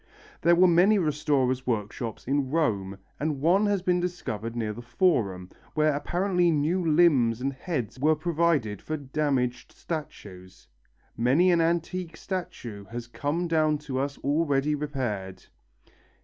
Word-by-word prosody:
There 170 Hz, +1 st, +5 dB
were 180 Hz, +2 st, +6 dB
many 180 Hz, +5 st, +5 dB
restorers' 145 Hz, -6 st, 0 dB
workshops 115 Hz, 0 st, -3 dB
in 135 Hz, 0 st, 0 dB
Rome, 100 Hz, -11 st, 0 dB, 0.2 s
and 150 Hz, 0 st, -1 dB
one 185 Hz, +8 st, +3 dB
has 200 Hz, -3 st, 0 dB
been 180 Hz, -1 st, +2 dB
discovered 115 Hz, -, -4 dB
near 110 Hz, -3 st, -2 dB
the 120 Hz, -, -8 dB
Forum, 115 Hz, -, 0 dB, 0.2 s
where 155 Hz, -1 st, +3 dB
apparently 175 Hz, +4 st, +1 dB
new 165 Hz, +4 st, +1 dB
limbs 150 Hz, -8 st, +4 dB
and 135 Hz, +2 st, -2 dB
heads 130 Hz, -, -4 dB
were 155 Hz, +3 st, +3 dB
provided 155 Hz, -, 0 dB
for 155 Hz, -, -3 dB
damaged 135 Hz, -3 st, -1 dB
statues. 95 Hz, -, -8 dB, 0.5 s
Many 140 Hz, +10 st, +3 dB
an 170 Hz, -1 st, +3 dB
antique 170 Hz, 0 st, -1 dB
statue 120 Hz, -, -6 dB
has 120 Hz, +3 st, -7 dB
come 145 Hz, +8 st, -2 dB
down 155 Hz, -2 st, +2 dB
to 140 Hz, -3 st, -4 dB
us 140 Hz, +1 st, -2 dB
already 145 Hz, 0 st, +1 dB
repaired. 130 Hz, -11 st, -4 dB
145 Hz, 135 wpm, -27 LUFS, 120-170 Hz, 0.5 s, were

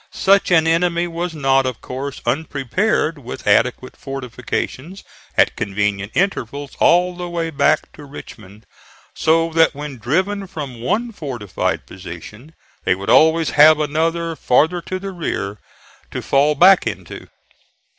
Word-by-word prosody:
Such 195 Hz, +1 st, +2 dB
an 165 Hz, -3 st, +4 dB
enemy 170 Hz, +1 st, +1 dB
was 170 Hz, 0 st, -4 dB
not, 135 Hz, -2 st, +2 dB
of 125 Hz, -3 st, -4 dB
course, 135 Hz, +2 st, -6 dB
unprepared 155 Hz, -, -1 dB
with 125 Hz, 0 st, -9 dB
adequate 125 Hz, +5 st, +1 dB
fortifications 135 Hz, +6 st, -5 dB, 0.3 s
at -, -, +4 dB
convenient 105 Hz, 0 st, -2 dB
intervals 145 Hz, -, -1 dB
all 180 Hz, +1 st, +3 dB
the 175 Hz, 0 st, -6 dB
way 165 Hz, -1 st, -3 dB
back 150 Hz, +1 st, +1 dB
to 150 Hz, -, -12 dB
Richmond, 110 Hz, -7 st, -12 dB, 0.5 s
so 165 Hz, +1 st, +2 dB
that 165 Hz, -2 st, +3 dB
when 145 Hz, -3 st, -7 dB
driven 190 Hz, -, -1 dB
from 140 Hz, -10 st, -7 dB
one 225 Hz, -, -1 dB
fortified 130 Hz, -, -3 dB
position 100 Hz, -, -11 dB, 0.3 s
they 90 Hz, -, +2 dB
would 95 Hz, +1 st, -2 dB
always 160 Hz, 0 st, +4 dB
have 155 Hz, +1 st, +6 dB
another 165 Hz, +2 st, -1 dB
farther 160 Hz, +6 st, +2 dB
to 185 Hz, -, -2 dB
the 195 Hz, +1 st, -6 dB
rear 105 Hz, -, -4 dB, 0.5 s
to -, -, -5 dB
fall 145 Hz, +2 st, +2 dB
back 190 Hz, +6 st, +6 dB
into. -, -, -7 dB
150 Hz, 135 wpm, -19 LUFS, 125-170 Hz, 0.5 s, have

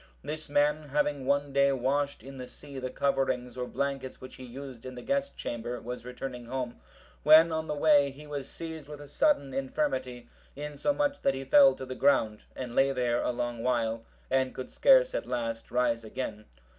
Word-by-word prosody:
This 155 Hz, 0 st, -5 dB
man, 145 Hz, +1 st, +2 dB
having 145 Hz, -1 st, 0 dB
one 140 Hz, 0 st, +1 dB
day 140 Hz, 0 st, +4 dB
washed 140 Hz, +2 st, 0 dB
in 135 Hz, 0 st, -10 dB
the 125 Hz, -, -6 dB
sea 140 Hz, 0 st, -9 dB
the 130 Hz, 0 st, -3 dB
coverings 130 Hz, -2 st, 0 dB
or 125 Hz, -1 st, -3 dB
blankets 135 Hz, -1 st, -3 dB
which 130 Hz, -, -10 dB
he 130 Hz, -, -10 dB
used 130 Hz, -1 st, -9 dB
in 130 Hz, 0 st, -7 dB
the 125 Hz, -, -8 dB
guest 275 Hz, 0 st, -1 dB
chamber, 120 Hz, +1 st, -4 dB
was 125 Hz, 0 st, -7 dB
returning 125 Hz, -1 st, -6 dB
home, 125 Hz, -1 st, -4 dB, 0.4 s
when 160 Hz, +2 st, +7 dB
on 160 Hz, 0 st, -2 dB
the 150 Hz, -, -2 dB
way, 145 Hz, -1 st, +5 dB
he 140 Hz, +3 st, -12 dB
was 145 Hz, -2 st, -5 dB
seized 160 Hz, -3 st, -7 dB
with 150 Hz, -1 st, -9 dB
a 145 Hz, -, -10 dB
sudden 145 Hz, -, +2 dB
infirmity, 130 Hz, -2 st, -2 dB, 0.3 s
insomuch 280 Hz, -, -1 dB
that 135 Hz, -, +2 dB
he 135 Hz, -, -4 dB
fell 280 Hz, -, +7 dB
to 130 Hz, -, -7 dB
the 130 Hz, -, -5 dB
ground, 115 Hz, -6 st, +2 dB
and 125 Hz, -2 st, -5 dB
lay 135 Hz, +2 st, +4 dB
there 120 Hz, -2 st, +1 dB
a -, -, 0 dB
long 120 Hz, -1 st, -3 dB
time 115 Hz, -2 st, +1 dB, 0.3 s
and 130 Hz, -1 st, +1 dB
could 130 Hz, -, -6 dB
scarce -, -, +5 dB
at -, -, -3 dB
last 115 Hz, -2 st, -3 dB
rise 120 Hz, -2 st, +1 dB
again. 110 Hz, -1 st, -5 dB
135 Hz, 195 wpm, -29 LUFS, 125-145 Hz, 0.4 s, when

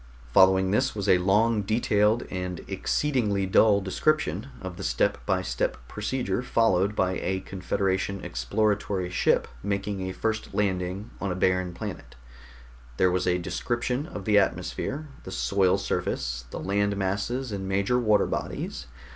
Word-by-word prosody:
Following 95 Hz, 0 st, +5 dB
this 105 Hz, -, +1 dB
was 100 Hz, -1 st, -3 dB
a 90 Hz, -, +5 dB
long, 105 Hz, +4 st, +3 dB
detailed 105 Hz, +1 st, +2 dB
and 90 Hz, -2 st, -4 dB
exceedingly 110 Hz, -9 st, 0 dB
dull 100 Hz, +2 st, +4 dB
description 100 Hz, -, 0 dB
of 95 Hz, -2 st, -6 dB
the -, -, -6 dB
step -, -, 0 dB
by -, -, +1 dB
step -, -, -1 dB
procedure 105 Hz, -1 st, -2 dB
followed 105 Hz, -5 st, +2 dB
by 95 Hz, -2 st, +1 dB
a 95 Hz, 0 st, -1 dB
Confederation 95 Hz, +1 st, -2 dB
exploratory 100 Hz, -, -1 dB
ship -, -, +2 dB
making 100 Hz, +1 st, -2 dB
a 95 Hz, 0 st, -3 dB
first 110 Hz, +3 st, -3 dB
landing 95 Hz, 0 st, -1 dB
on 100 Hz, -, -1 dB
a -, -, -2 dB
barren 90 Hz, 0 st, +1 dB
planet. 85 Hz, -, -7 dB, 0.8 s
There 90 Hz, -1 st, +4 dB
was 90 Hz, 0 st, 0 dB
a 90 Hz, 0 st, +3 dB
description 120 Hz, -, -2 dB
of 100 Hz, -, -7 dB
the 105 Hz, -1 st, +5 dB
atmosphere, 140 Hz, +8 st, -2 dB, 0.2 s
the -, -, -8 dB
soil 90 Hz, +10 st, +2 dB
surface, 60 Hz, -2 st, -2 dB
the -, -, -6 dB
land 100 Hz, +1 st, 0 dB
masses 105 Hz, +7 st, -2 dB
and 95 Hz, -1 st, -4 dB
major 100 Hz, +6 st, +1 dB
water 110 Hz, -3 st, +3 dB
bodies. -, -, -4 dB
100 Hz, 145 wpm, -26 LUFS, 95-105 Hz, 0.8 s, Following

